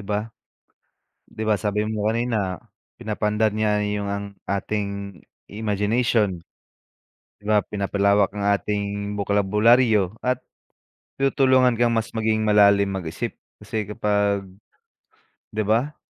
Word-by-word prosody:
ba? 105 +2 -2 1.0
'Diba 110 -1 +1
sabi 105 +1 -1
mo 110 -1 -2
kanina, 110 -6 -1 0.4
pinapaandar 105 0 0
niya 105 -1 +1
yo 105 0 -2
ang 100 0 -5
ating 100 -1 -3 0.3
imagination. 105 -2 0 0.9
'Di 105 - -26
ba, 105 0 +3
pinapalawak 100 0 +1
ang 100 0 -1
ating 100 0 -3
bokabularyo 105 +1 +3
at 125 0 +1 0.8
tinutulungan 130 -2 +3
kang 120 -1 +4
mas 115 0 -2
maging 110 -1 0
malalim 100 -1 +4
mag-isip 90 -4 -4 0.2
kasi 110 -3 -4
kapag 105 -2 0 1.0
'di 110 0 -2
ba? 115 +8 0
105 Hz, 105 wpm, -23 LUFS, 100-110 Hz, 1.0 s, kang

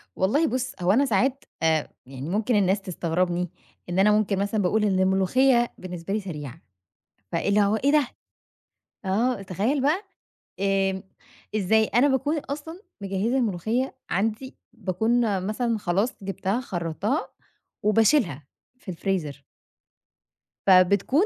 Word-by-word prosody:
والله 285 - +2
بُص، 255 -1 -2
هو 175 - +3
أنا 270 +7 +4
ساعات 260 +4 +1 0.2
آآ، 160 -2 +2 0.2
يعني 135 +3 -7
ممكن 215 +5 +1
الناس 195 0 +2
تستغربني 175 -1 -1 0.4
إن 175 +2 0
أنا 210 +2 +5
ممكن 210 -2 +2
مثلًا 205 +2 0
باقول 210 +4 +1
إن 195 -3 +2
الملوخية 235 +7 +3
بالنسبة 180 0 -6
لي 215 - +1
سريعة، 155 - -7 0.7
فإيه - - 0
اللى 210 +1 +4
هو 205 +1 +2
إيه 275 +6 +2
دة؟ 295 -3 +3 1.0
آه، 220 +4 +1
تخيل 210 - -1
بقى 315 +9 +1 0.6
آمم، 195 -1 +1 0.5
إزاي؟ 220 +2 +3
أنا 245 +5 +3
باكون 285 +3 +1
أصلًا 305 +6 -6 0.2
مجهزة 200 +6 -1
الملوخية 230 +3 -1
عندي، 220 +7 -2 0.2
باكون 220 0 0
مثلًا 230 +1 0
خلاص 200 +5 0
جبتها 195 +4 -2
خرّطتها 190 - -2 0.5
وباشيلها 210 - +2 0.3
في 210 - -11
الفريزر. 165 -6 -3 1.2
فبتكون 200 - +5
205 Hz, 125 wpm, -25 LUFS, 185-245 Hz, 1.2 s, أنا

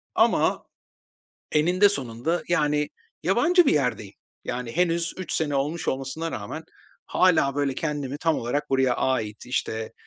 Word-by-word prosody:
ama - - +3 0.9
eninde 180 +6 +4
sonunda, 135 - -2
yani, 150 -3 +1 0.3
yabancı 250 - +4
bir - - +4
yerdeyim. 125 -8 -1 0.3
Yani, 120 0 -4
henüz 170 -1 +1
3 185 - -5
sene 150 -3 0
olmuş 150 +5 -2
olmasına 135 +5 -2
rağmen - - -5 0.4
hâlâ, 160 -7 +3
böyle, 140 -2 0
kendimi 145 -3 -3
tam 160 0 +1
olarak 145 +5 -2
buraya 130 -2 +3
ait, 115 -4 -1
işte, 110 -3 -2
145 Hz, 130 wpm, -25 LUFS, 130-165 Hz, 0.9 s, eninde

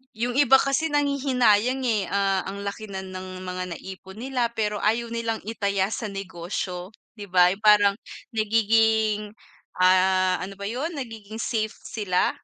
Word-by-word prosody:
Yung 245 +3 -2
iba 275 -2 +6
kasi 275 +4 +2
nanghihinayang, 265 -4 +2
eh, 215 -6 +1
ah, 195 -1 0
ang 200 +1 -6
laki 200 +2 -5
na 190 -1 -6
ng 185 0 -8
mga 185 0 -4
na-ipon 190 +1 -10
nila 255 -2 0
pero 210 -2 -1
ayaw 230 +2 0
nilang 230 -1 -2
i-taya 200 -2 -1
sa 220 - -3
negosyo 185 -1 -5 0.2
di 205 - -7
ba 180 -2 +5
yung 195 +4 -5
parang 205 -1 +6 0.3
nagiging, 220 -1 +2 0.5
ah, 185 0 +4
ano 195 +2 -6
ba 200 - -9
yun? 275 +9 -3
Nagiging 225 -6 -7
safe 220 -2 -1
sila? 205 -5 0
210 Hz, 150 wpm, -25 LUFS, 190-230 Hz, 0.5 s, iba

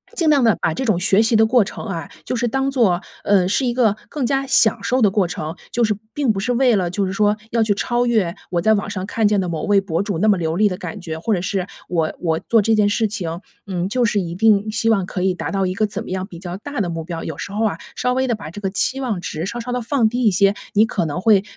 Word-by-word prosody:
尽 330 -3 0
量 280 -4 +4
地 225 -3 +4
把 160 - 0
这 265 - -3
种 215 -8 +1
学 195 +3 +3
习 225 +1 +2
的 220 0 +5
过 240 0 +4
程 195 - -7
啊， 170 -7 -5 0.2
就 - - -2
是 240 0 0
当 270 +3 0
做， 210 -10 +2 0.2
呃， 195 -3 +3
是 245 +7 +1
一 - - +1
个 225 -5 +2
更 285 -4 -2
加 270 +2 0
享 230 -4 +3
受 255 +1 +1
的 205 -5 +4
过 195 -3 +1
程， 160 -1 -5 0.2
就 240 - +1
是 210 -2 +2 0.2
并 280 -6 +1
不 195 - -3
是 245 +5 -1
为 245 -1 +3
了 180 -3 0
就 195 +2 -1
是 185 - -3
说 210 +1 +2
要 230 -1 +1
去 215 -2 +2
超 240 +3 0
越 210 -8 +1 0.2
我 175 - 0
在 220 +5 +3
网 200 -1 -1
上 190 -2 -4
看 220 0 +1
见 205 -1 +2
的 185 - -1
某 165 -2 -3
位 205 -1 +4
博 185 -3 -2
主 200 -4 -2
那 215 +5 +1
么 200 -4 +4
流 160 0 -1
利 210 +2 +4
的 185 - -2
感 210 - -7
觉， 160 -3 -6
或 215 +5 0
者 180 - -1
是 190 0 -2 0.2
我 165 -3 -1
我 160 -2 0
做 225 -3 +2
这 225 +2 +2
件 210 -1 +3
事 220 +1 +1
情， 175 -5 -4 0.3
嗯， 180 -1 -2
就 245 +1 +1
是 215 -3 +1
一 170 -3 -3
定 215 +2 +3
希 225 +1 0
望 195 -5 +2
可 180 - -4
以 185 -1 +1
达 - - -4
到 195 -2 0
一 185 - -3
个 215 - +2
怎 205 +1 -5
么 - - -10
样 185 0 -2
比 175 -4 -11
较 180 -1 -6
大 285 +5 -6
的 175 - -1
目 165 -1 -4
标。 165 0 -6
有 160 - -5
时 - - -6
候 215 +2 -1
啊， 215 - -1 0.2
稍 250 +1 0
微 260 +1 +1
地 240 - +1
把 205 -7 -6
这 205 - -9
个 195 -2 -2
期 265 +6 0
望 215 -9 -2
值 160 -1 -4
稍 235 +4 -4
稍 245 +1 -5
地 245 -1 -2
放 235 -3 +2
低 245 +2 -2
一 215 - +5
些， 195 +2 +3 0.2
你 215 +2 +5
可 180 -7 -1
能 160 +4 -3
会 205 -3 +4
205 Hz, 320 characters per minute, -20 LUFS, 185-230 Hz, 0.3 s, 的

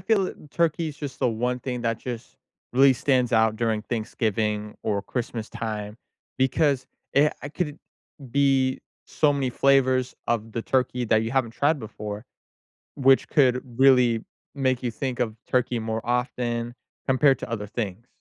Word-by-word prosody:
feel 200 -4 +1 0.2
turkey’s 160 -2 0
just 145 -3 -6
the 130 - +2
one 125 +3 -1
thing 125 -1 -4
that 115 -1 0
just 120 -2 -7 0.4
really 135 +1 +6
stands 125 -2 +1
out 110 -1 +3
during 110 -2 0
Thanksgiving 110 -2 -2
or 100 -2 -1
Christmas 115 0 -4
time 105 -1 -5 0.4
because, 135 +1 +2 0.3
eh 150 +2 +5
I 145 - -4
could 160 +1 -2
it 145 - -11 0.5
be 135 -2 +2 0.3
so 150 -2 +2
many 135 -2 -1
flavors 130 -1 +3
of 115 -1 -1
the 115 - -3
turkey 125 -1 0
that 110 0 +3
you 115 - -3
haven't 125 -3 0
tried 145 +4 +2
before, 105 0 -6 0.7
which 135 -1 +4
could 125 -3 +3 0.2
really 125 -4 +5 0.3
make 130 -3 0
you 120 - -1
think 125 +1 -4
of 110 -2 -1
turkey 125 -1 +1
more 110 0 -3
often 120 -1 -1 0.3
compared 135 +1 +4
to - - -6
other 105 -3 -3
things. 110 +1 -5
125 Hz, 155 wpm, -25 LUFS, 115-135 Hz, 0.7 s, really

